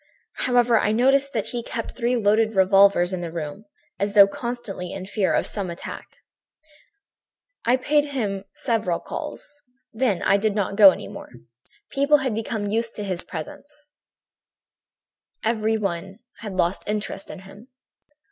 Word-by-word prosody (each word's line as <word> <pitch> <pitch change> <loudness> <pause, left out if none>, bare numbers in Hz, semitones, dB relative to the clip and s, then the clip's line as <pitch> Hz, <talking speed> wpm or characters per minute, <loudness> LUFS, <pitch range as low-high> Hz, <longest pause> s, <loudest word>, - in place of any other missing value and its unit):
"However, 245 -2 +4
I 210 - +1
noticed 270 +4 +3
that 220 -4 -2
he 240 - -3
kept 230 0 -5
three 245 0 0
loaded 220 0 +2
revolvers 190 -1 +5
in 180 - -3
the 170 -2 -5
room, 165 +5 -6 0.3
as 200 0 -1
though 200 -1 +10
constantly 200 -4 -5
in 190 -1 -6
fear 200 0 0
of - - +1
some 200 -4 -3
attack. 170 - -7 1.6
"I 245 +2 +4
paid 290 +3 +2
him 210 -9 -3
several 220 -9 -1
calls. 290 0 -7 0.3
Then 220 -6 0
I 200 - +4
did 210 0 0
not 200 -2 -1
go 200 -2 +10
any - - -3
more. 200 - -10 0.6
People 280 +2 +4
had 265 -4 -2
become 220 -1 -3
used 225 +3 -1
to 210 - -4
his 185 -3 -2
presence; 295 - -9 1.5
everybody 215 -5 -1 0.2
had 210 -3 -6
lost 180 0 0
interest 210 -2 -3
in 190 - -8
him. 200 +5 -14
210 Hz, 145 wpm, -23 LUFS, 195-240 Hz, 1.6 s, though